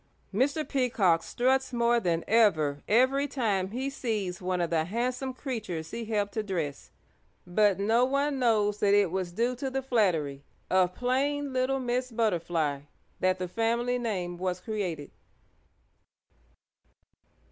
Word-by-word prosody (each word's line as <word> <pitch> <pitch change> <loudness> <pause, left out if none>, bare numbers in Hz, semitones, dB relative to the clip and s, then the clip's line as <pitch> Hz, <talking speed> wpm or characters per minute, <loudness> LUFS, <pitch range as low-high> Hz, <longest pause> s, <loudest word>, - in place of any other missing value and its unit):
Mr. 285 +8 +1
Peacock 225 - +2
struts 265 +6 +1
more 235 -1 +2
than 170 -5 0
ever 155 -11 +3
every 260 +5 +3
time 210 -9 -1
he 255 +6 -3
sees 215 -10 -3
one 180 0 -1
of 170 -1 -1
the 160 -1 +1
handsome 250 +7 -2
creatures 215 - -5
he 230 0 -4
helped 205 -2 -1
to 220 - -1
dress, 170 -9 -4 0.6
but 200 +2 +3
no 225 +4 +3
one 275 +2 +1
knows 210 -4 +2
that 205 -1 +4
it 200 -4 +3
was 185 -1 -2
due 235 +7 0
to 265 +2 -3
the 265 0 -3
flattery 165 - +1 0.3
of 185 -1 +3
plain 275 +3 0
little 260 +1 +1
Miss 250 0 -1
Butterfly 170 - 0 0.4
that 185 0 +2
the 185 0 -3
family 235 +5 0
name 185 -7 -3
was 185 -1 -2
created. 180 -9 -4
220 Hz, 140 wpm, -28 LUFS, 180-250 Hz, 0.6 s, that